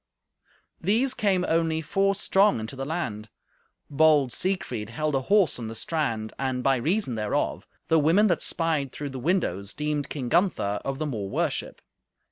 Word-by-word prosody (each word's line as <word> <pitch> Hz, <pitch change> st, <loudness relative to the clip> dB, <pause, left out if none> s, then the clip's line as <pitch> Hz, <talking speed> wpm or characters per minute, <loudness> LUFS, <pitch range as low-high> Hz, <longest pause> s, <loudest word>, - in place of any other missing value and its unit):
These 230 Hz, +9 st, +2 dB
came 190 Hz, -3 st, +1 dB
only 165 Hz, -1 st, +1 dB
four 195 Hz, +4 st, +1 dB
strong 195 Hz, -, +3 dB
into 110 Hz, +5 st, -6 dB
the 135 Hz, 0 st, -4 dB
land. 115 Hz, -10 st, -4 dB, 0.6 s
Bold 145 Hz, -3 st, +3 dB
Siegfried 130 Hz, -, -2 dB
held 155 Hz, +6 st, -2 dB
a 135 Hz, -, +1 dB
horse 195 Hz, -2 st, +2 dB
on 115 Hz, -, -5 dB
the 115 Hz, -, -6 dB
strand, 115 Hz, -7 st, -2 dB
and, 130 Hz, -1 st, -1 dB
by 135 Hz, -1 st, +3 dB
reason 160 Hz, -, 0 dB
thereof, 105 Hz, -2 st, -2 dB, 0.2 s
the 160 Hz, -, +4 dB
women 165 Hz, +8 st, +4 dB
that 175 Hz, -6 st, +1 dB
spied 155 Hz, -5 st, -1 dB
through 145 Hz, -1 st, -5 dB
the 130 Hz, -, -6 dB
windows 110 Hz, -, -1 dB
deemed 150 Hz, -1 st, -2 dB
King 135 Hz, -5 st, -4 dB
Gunther 120 Hz, -, +1 dB
of 135 Hz, 0 st, -3 dB
the 155 Hz, -, -2 dB
more 110 Hz, -9 st, -4 dB
worship. -, -, -2 dB
150 Hz, 165 wpm, -26 LUFS, 120-175 Hz, 0.6 s, the